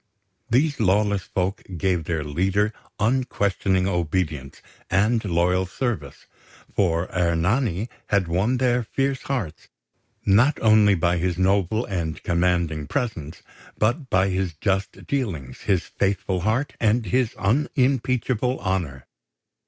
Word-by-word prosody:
These 140 +5 +2
lawless 105 -1 +2
folk 95 +2 -2 0.2
gave 90 -2 0
their 80 -2 -1
leader 95 +8 0 0.3
unquestioning 100 -5 +1
obedience 80 -6 -2 0.3
and 110 +4 +2
loyal 90 0 +1
service; 90 - -4 0.5
for 85 -2 +1
Ernani 90 +5 +1 0.2
had 100 -4 +1
won 95 +10 +1
their 125 -1 +2
fierce 135 +3 -1
hearts, 115 - -4 0.6
not 120 +10 +4
only 105 -2 +5
by 85 0 +1
his 90 0 -1
noble 100 +4 +1
and 85 -5 -4
commanding 85 -3 0
presence, 95 - -4 0.3
but 125 +6 0
by 95 +1 +3
his 95 -3 -2
just 95 +3 -2
dealings, 90 - -3
his 95 -4 +1
faithful 95 -1 -1
heart, 110 +9 0
and 110 +1 +2
his 125 -1 0
unimpeachable 125 +1 0
honour. 85 -9 -2
95 Hz, 115 wpm, -23 LUFS, 85-115 Hz, 0.6 s, only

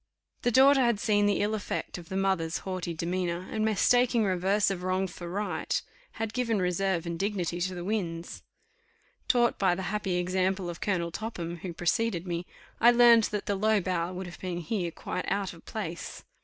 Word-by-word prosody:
The - - +2
daughter 270 +3 +6
had 235 -4 +2
seen 205 -3 +3
the 205 - +2
ill 210 +1 +1
effect 205 -3 -3
of 170 - -13
the 190 - -2
mother's 190 -4 +1
haughty 185 -2 -3
demeanour, 175 +1 -2
and, 215 -1 -1
mistaking 235 +2 +3
reverse 195 +1 +2
of 185 -2 -3
wrong 185 +1 0
for 175 -1 -7
right, 205 +3 -1 0.3
had 225 -1 -4
given 230 -3 0
reserve 180 -1 0
and 170 -1 -4
dignity 185 -4 -1
to 185 +1 -1
the 175 - -5
winds. 175 -5 -3 0.9
Taught 240 -1 +3
by 185 -3 +3
the 190 - -4
happy 200 -3 -1
example 185 0 0
of 170 - -11
Colonel 175 -4 0
Topham, 175 -4 -5
who 175 +1 -6
preceded 175 +2 0
me, 175 0 -3 0.3
I 235 - +7
learned 235 -2 +7
that 210 -1 -3
the 205 - 0
low 215 +2 +2
bow 175 -2 -1
would 185 +1 -5
have 175 - -10
been 180 -2 -4
here 180 0 -2
quite 180 +2 -5
out 195 -1 -1
of 165 - -16
place. 175 -7 -5
190 Hz, 190 wpm, -29 LUFS, 175-215 Hz, 0.9 s, I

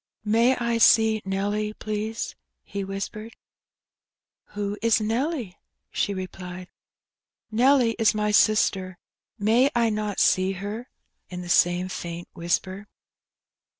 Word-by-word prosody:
May 230 +4 +3
I 235 -1 0
see 220 -1 +5
Nelly, 205 +2 -1
please?" 215 +1 -4 0.3
he 200 0 -5
whispered. 200 +3 -6 1.2
Who 205 0 -2
is 230 0 +3
Nelly?" 230 - -2 0.4
she - - -1
replied. 185 -1 -7 0.8
Nelly 245 +1 +4
is 220 -1 +3
my 210 0 0
sister; 195 -3 +2 0.4
may 230 +6 +3
I 230 -2 +2
not 210 -1 -2
see 185 +1 +3
her?" 205 +6 -6 0.4
in 180 0 -6
the 175 - -9
same 175 +1 +3
faint 175 -2 -6
whisper. 185 +4 -2
210 Hz, 115 wpm, -25 LUFS, 185-225 Hz, 1.2 s, see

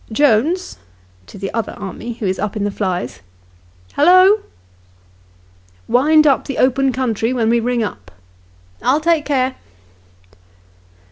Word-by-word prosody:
" - - -24
Jones 295 - +1 0.2
" 90 0 -33
[to - - -12
the 195 0 -5
other 230 -1 -3
army 205 +4 -7
who 225 -2 -6
is 190 0 -1
up 210 +1 -3
in 210 - -2
the 205 - -1
flies]. 180 - -4 0.3
" 90 0 -31
Hallo! 370 +6 +5 0.4
" 90 0 -33 0.2
" 90 0 -33
Wind 310 +2 +4
up 275 -3 +2
the 275 - -5
open 265 +1 +2
country 235 -3 -1
when 230 -3 +1
we 235 - +3
ring 240 0 -1
up." 100 - -7 0.4
" 90 0 -32
I'll 255 +6 +2
take 325 -1 +1
care." 260 -2 -1
225 Hz, 160 wpm, -18 LUFS, -, 0.4 s, Hallo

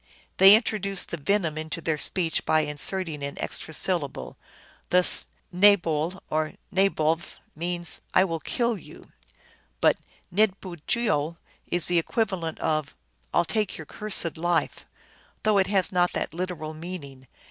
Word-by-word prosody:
They 195 +2 +9
introduce 200 -4 0
the - - -5
venom 165 -1 0
into 160 +1 -5
their 160 -2 -2
speech 170 0 +1
by 155 - +3
inserting 150 +2 0
an 140 0 -6
extra - - -2
syllable. 160 -3 -1 0.5
Thus 180 0 +5 0.3
nabole 180 -3 +3
or 155 0 -1 0.2
naboV 170 -4 +1 0.2
means, 175 +1 -1
" - - -36
I 185 - +6
will 165 -4 -2
kill 235 +3 -1
you," - - -15 0.7
but - - +4 0.4
ndbujeol 185 -3 0 0.3
is 175 -1 +1
the 175 -1 +3
equivalent 180 -4 -2
of 155 -2 -1 0.2
" - - -44
I - - +3
11 - - -24
take 215 -3 -1
your 160 - -8
cursed 190 -3 +1
life," 175 0 -1 0.6
though 215 -2 +3
it 190 - +2
has 195 -2 +2
not 180 -1 +1
that - - -3
literal 170 -3 -4
meaning. 155 -6 -9
175 Hz, 145 wpm, -25 LUFS, 155-195 Hz, 0.7 s, They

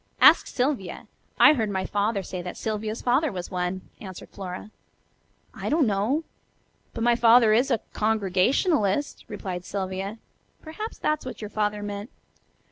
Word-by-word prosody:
"Ask - - +7
Sylvia. 250 -8 -2 0.3
I 305 - +9
heard 225 -7 0
my 190 -1 -2
father 205 0 0
say 180 0 -5
that 180 0 -7
Sylvia's 215 0 -3
father 265 +4 +2
was 180 -1 -6
one," 180 0 -2 0.2
answered 190 -3 -9
Flora. 190 +2 -7 0.8
"I - - -4
don't 305 -1 +3
know. 220 +9 +1 0.7
But 225 - -2
my 240 0 +4
father 230 -1 +6
is 245 +5 +3
a 235 -4 +1
Congregationalist," 215 - +1
replied 185 -4 -5
Sylvia. 195 +2 -4 0.4
"Perhaps 425 +8 -7
that's 305 0 0
what 255 - -7
your 210 -1 -7
father 210 -1 -1
meant." 205 +2 -5
210 Hz, 145 wpm, -26 LUFS, 195-245 Hz, 0.8 s, I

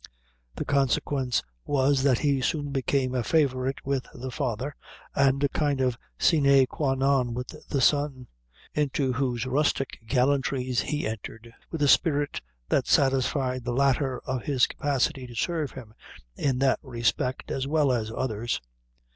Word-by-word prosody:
The - - -4
consequence 135 -2 +1 0.2
was, 140 -1 +2
that 135 -3 +3
he 140 -1 +1
soon 145 +2 -1
became 135 -1 0
a 125 - +1
favorite 135 -2 0
with 135 -2 -1
the 130 +1 -6
father, 130 +1 -3 0.4
and 140 0 +2
a 140 - +3
kind 145 -2 0
of 130 -2 +1 0.2
sine 140 -4 +5
qua 135 0 -1
non 135 -3 +1
with 125 0 -5 0.2
the 140 - 0
son, 145 -2 +2 0.5
into 140 -3 0
whose 125 -2 -1
rustic 135 +1 0
gallantries 130 0 +1
he 150 0 -2
entered, 115 +1 -7 0.2
with 160 -3 -2
a - - +4
spirit 145 -1 +2 0.3
that - - +1
satisfied 130 -1 +2
the 120 0 -2
latter 135 0 +2
of 130 -1 -2
his 130 -2 +2
capacity 140 -1 -1
to 120 - -11
serve 155 +3 -1
him 115 -5 -10 0.4
in 135 -3 0
that 135 0 +2
respect 125 0 -1
as 135 0 -2
well 150 -2 +2
as 115 -3 -1
others. 115 -1 -2
135 Hz, 150 wpm, -27 LUFS, 125-140 Hz, 0.5 s, sine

